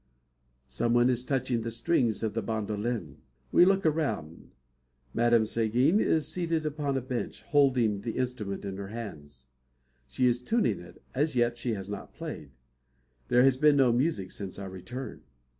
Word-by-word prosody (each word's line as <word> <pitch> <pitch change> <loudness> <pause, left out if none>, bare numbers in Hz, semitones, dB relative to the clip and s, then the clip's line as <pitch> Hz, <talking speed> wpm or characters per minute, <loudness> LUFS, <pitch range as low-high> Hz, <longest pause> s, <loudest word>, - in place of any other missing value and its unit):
Someone 120 - +2
is 125 0 -1
touching 130 -3 0
the 115 - -3
strings 115 -2 +1
of 110 -1 -2
a 115 - 0
bandolin. 110 +1 -3 0.3
We 175 - +7
look 195 0 +2
around. 145 - -1 0.6
Madame 120 -1 +4
Seguin 120 - +2
is 155 -7 +2
seated 165 -1 -1
upon 145 -2 -1
a - - -1
bench, 125 -1 -4
holding 125 -8 +2
the 115 0 -4
instrument 115 -6 -3
in 95 -1 -5
her 100 0 -5
hands. 75 - -8 0.6
She 125 - 0
is 120 0 +2
tuning 220 - +1
it. 90 0 -14
As 145 +2 0
yet 120 -1 +2
she 120 -1 -2
has 95 -1 -6
not 100 - -7
played. 75 - -7 0.8
There 125 +1 +5
has 135 -1 +4
been 150 +1 +5
no 135 -3 +5
music 120 - 0
since 100 -2 -6
our 100 -1 -6
return. 120 +8 -7
120 Hz, 160 wpm, -29 LUFS, 105-135 Hz, 0.8 s, We